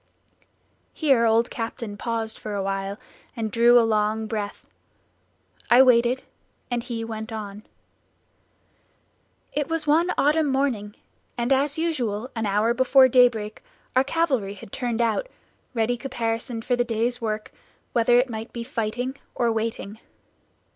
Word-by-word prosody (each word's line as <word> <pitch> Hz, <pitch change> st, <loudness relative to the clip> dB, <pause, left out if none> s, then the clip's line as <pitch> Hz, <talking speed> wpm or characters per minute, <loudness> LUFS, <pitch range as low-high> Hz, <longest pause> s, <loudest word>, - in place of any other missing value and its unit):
Here 270 Hz, -7 st, +3 dB
old 230 Hz, +1 st, +3 dB
Captain 225 Hz, -2 st, -5 dB
paused 225 Hz, 0 st, -3 dB
for 210 Hz, -1 st, -5 dB
awhile 195 Hz, 0 st, -2 dB, 0.4 s
and 220 Hz, -2 st, -3 dB
drew 240 Hz, +2 st, +6 dB
a 230 Hz, -, +3 dB
long 215 Hz, 0 st, +1 dB
breath; 210 Hz, -2 st, -5 dB, 1.0 s
I 250 Hz, +2 st, +8 dB
waited, 245 Hz, 0 st, +3 dB, 0.5 s
and 240 Hz, -1 st, 0 dB
he 230 Hz, -1 st, -5 dB
went 220 Hz, 0 st, -6 dB
on. 210 Hz, -1 st, -7 dB, 1.9 s
"It 295 Hz, -2 st, -1 dB
was 325 Hz, -1 st, -1 dB
one 320 Hz, +4 st, +3 dB
autumn 305 Hz, +2 st, +3 dB
morning, 265 Hz, -7 st, -1 dB, 0.4 s
and 240 Hz, +3 st, +2 dB
as 285 Hz, +2 st, +1 dB
usual, 255 Hz, -8 st, -2 dB
an 225 Hz, -2 st, -1 dB
hour 210 Hz, +4 st, +2 dB
before 260 Hz, +1 st, +5 dB
daybreak 235 Hz, -4 st, +3 dB, 0.3 s
our 260 Hz, -, +5 dB
cavalry 270 Hz, -10 st, 0 dB
had 195 Hz, -, -12 dB
turned 240 Hz, -2 st, -2 dB
out, 235 Hz, -, 0 dB, 0.5 s
ready 230 Hz, +2 st, +1 dB
caparisoned 230 Hz, -3 st, -3 dB
for 250 Hz, -, +2 dB
the 245 Hz, -, +1 dB
day's 235 Hz, +1 st, -1 dB
work, 215 Hz, -1 st, -3 dB, 0.4 s
whether 240 Hz, 0 st, +4 dB
it 250 Hz, +2 st, +3 dB
might 225 Hz, -1 st, -6 dB
be 235 Hz, -, -5 dB
fighting 245 Hz, +1 st, -3 dB, 0.2 s
or 235 Hz, -1 st, +1 dB
waiting. 220 Hz, -1 st, -3 dB
235 Hz, 135 wpm, -24 LUFS, 220-255 Hz, 1.9 s, I